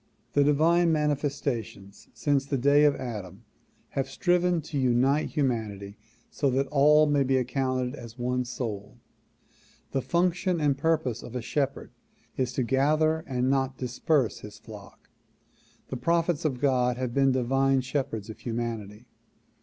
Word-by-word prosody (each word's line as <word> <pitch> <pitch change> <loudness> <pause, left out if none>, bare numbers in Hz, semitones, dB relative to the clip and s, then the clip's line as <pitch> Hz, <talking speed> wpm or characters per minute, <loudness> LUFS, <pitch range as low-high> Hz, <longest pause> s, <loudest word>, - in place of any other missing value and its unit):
The 145 - +4
divine 165 +4 +3
manifestations 140 -9 -2
since 140 -2 0
the 140 - -1
day 140 +3 +4
of 145 - +4
Adam 100 -7 -7 0.5
have 135 -1 -3
striven 180 +1 +1
to 145 -1 -4
unite 130 +3 +2
humanity 110 -8 -2 0.4
so 140 - 0
that 135 +2 +1
all 150 +2 +5
may 145 -1 +2
be 135 0 +2
accounted 130 0 -1
as 115 -4 -10
one 125 +1 -1
soul 110 -5 -5 0.9
The 135 - 0
function 175 +2 0
and 145 -2 +2
purpose 140 -5 0
of 120 - -10
a 125 - -2
shepherd 140 +2 -2 0.4
is 130 -1 -1
to 130 - 0
gather 155 +5 +2
and 125 -1 -1
not 135 -1 0
disperse 130 +1 0
his 105 0 -11
flock. 105 -2 -13 0.8
The 130 - -4
prophets 165 +4 0
of 130 -5 -1
God 125 -3 +2
have 125 -2 -3
been 135 0 +3
divine 135 +1 +2
shepherds 125 -5 -3
of 110 - -9
humanity. 115 -2 -5
135 Hz, 145 wpm, -27 LUFS, 120-145 Hz, 0.9 s, all